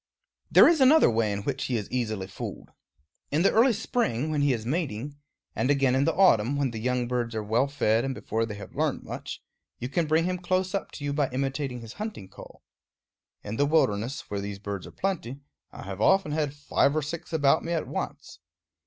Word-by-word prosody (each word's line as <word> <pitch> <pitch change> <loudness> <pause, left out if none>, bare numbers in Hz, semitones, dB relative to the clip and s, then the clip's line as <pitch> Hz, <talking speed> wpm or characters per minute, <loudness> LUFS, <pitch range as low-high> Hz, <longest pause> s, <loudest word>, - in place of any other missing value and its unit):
There - - +8
is 325 -4 +3
another 275 - +6
way 110 -2 +1
in 100 0 -3
which 135 +2 -2
he 125 - 0
is 105 - -4
easily 110 -6 -2
fooled. 95 - -8 0.6
In 155 +4 +1
the - - +5
early 240 +4 +5
spring, 160 - -1
when 150 -2 0
he 145 -1 +3
is 115 -3 -2
mating, 145 -1 -3 0.4
and 130 - 0
again 135 -3 +3
in 135 +2 +2
the 165 - +1
autumn, 140 - +4
when 140 -3 0
the 115 - -5
young 125 +1 0
birds 120 -2 -2
are 110 - -2
well 115 +6 +1
fed 115 -5 +1
and 135 -1 -2
before 115 -2 -2
they 105 - -6
have 100 - -10
learned - - -1
much, - - -7 0.3
you 125 - -4
can 165 +3 0
bring 160 +2 +3
him 180 0 -1
close 185 +1 0
up 195 - -3
to - - -8
you 140 - -1
by 145 -2 +1
imitating 135 -1 -3
his 115 0 -9
hunting 210 - -6
call. - - -14 0.8
In 105 +2 -5
the 145 - +3
wilderness, 125 -5 +1
where 100 -1 -5
these 100 0 -5
birds 100 -2 -6
are - - -11
plenty, 145 -9 -3 0.3
I - - -10
have 95 +1 -6
often 190 - +3
had 150 -2 -1
five 145 0 +1
or 155 - 0
six 160 +3 -6
about 155 -1 +3
me 170 - -4
at 165 - -2
once. - - -6
135 Hz, 215 wpm, -27 LUFS, 115-160 Hz, 0.8 s, There